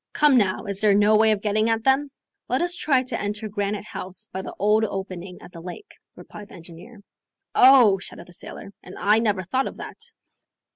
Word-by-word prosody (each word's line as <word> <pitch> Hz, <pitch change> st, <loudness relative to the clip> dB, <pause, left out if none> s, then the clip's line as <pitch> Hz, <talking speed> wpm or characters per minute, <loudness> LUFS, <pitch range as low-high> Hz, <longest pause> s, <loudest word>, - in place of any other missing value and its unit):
Come 295 Hz, -3 st, +4 dB
now, 205 Hz, -3 st, +1 dB
is 200 Hz, -1 st, -3 dB
there 210 Hz, -2 st, +4 dB
no 210 Hz, +1 st, +4 dB
way 220 Hz, +1 st, +5 dB
of 210 Hz, -1 st, -1 dB
getting 215 Hz, +1 st, +1 dB
at 225 Hz, 0 st, 0 dB
them?" 270 Hz, +2 st, +2 dB, 0.4 s
"Let -, -, +1 dB
us 350 Hz, 0 st, 0 dB
try 275 Hz, -6 st, +1 dB
to 245 Hz, -2 st, -3 dB
enter 210 Hz, +1 st, -4 dB
Granite 205 Hz, 0 st, -3 dB
House 185 Hz, -2 st, -7 dB
by 190 Hz, -, -4 dB
the -, -, -9 dB
old 210 Hz, +2 st, +2 dB
opening 190 Hz, -3 st, -5 dB
at -, -, -13 dB
the 170 Hz, -, -11 dB
lake," 185 Hz, -, -10 dB, 0.2 s
replied 210 Hz, -1 st, -12 dB
the -, -, -13 dB
engineer. 175 Hz, +6 st, -13 dB, 0.5 s
"Oh!" 250 Hz, -7 st, +6 dB
shouted 175 Hz, -, -10 dB
the 175 Hz, -, -15 dB
sailor, 195 Hz, +3 st, -7 dB
"and 180 Hz, -, -12 dB
I 210 Hz, +2 st, +3 dB
never 205 Hz, -4 st, 0 dB
thought 260 Hz, +10 st, -1 dB
of -, -, -9 dB
that." -, -, -9 dB
210 Hz, 205 wpm, -23 LUFS, 190-230 Hz, 0.5 s, Oh